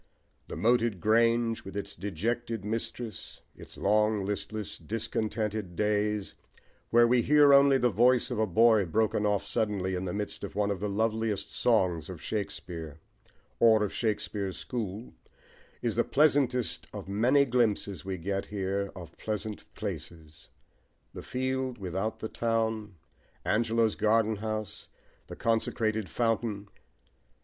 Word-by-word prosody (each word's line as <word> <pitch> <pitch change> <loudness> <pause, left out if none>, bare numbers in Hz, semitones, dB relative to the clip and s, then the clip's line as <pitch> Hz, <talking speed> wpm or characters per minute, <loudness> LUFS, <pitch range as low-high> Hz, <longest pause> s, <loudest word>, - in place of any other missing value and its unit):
The - - -6
moated 115 -4 +2
grange, 115 +2 +2
with 95 +1 -7
its 100 0 -5
dejected 110 +4 -3
mistress, 115 +1 -4
its - - -12
long, 105 0 +2
listless, 105 +1 -4
discontented 105 0 -3
days, 105 0 0 0.6
where 120 0 +6
we 120 0 +4
hear 145 +1 +6
only 140 -1 +6
the 125 -2 +2
voice 120 +5 +3
of 120 - -2
a 110 - +2
boy 110 +1 +5
broken 105 +3 +1
off 100 -1 0
suddenly 100 -4 -1
in 90 +1 -2
the 90 - -2
midst 105 +2 -4
of 100 - -6
one 105 0 +1
of 100 - -3
the 105 - -2
loveliest 110 0 -1
songs 90 -9 +1
of 90 -3 -7
Shakespeare, 85 -7 -5 0.6
or 110 -2 +6
of 105 - -2
Shakespeare's 105 -3 -2
school,* 110 -2 -5 0.7
is - - 0
the - - +3
pleasantest 135 -5 +2
of - - -8
many 125 +8 +3
glimpses 110 - 0
we 95 -1 -4
get 95 +3 -3
here 100 0 -2
of 85 -3 -10
pleasant 105 0 -5
places 80 -2 -7 0.6
the - - -7
field 130 0 -2
without 95 +3 -3
the 110 - -2
town, 110 -3 -1 0.5
Angelo's 115 0 +2
garden 110 0 +2
house, 110 0 -4 0.4
the - - -8
consecrated 110 -3 0
fountain. 110 -1 -1
110 Hz, 135 wpm, -29 LUFS, 100-115 Hz, 0.7 s, where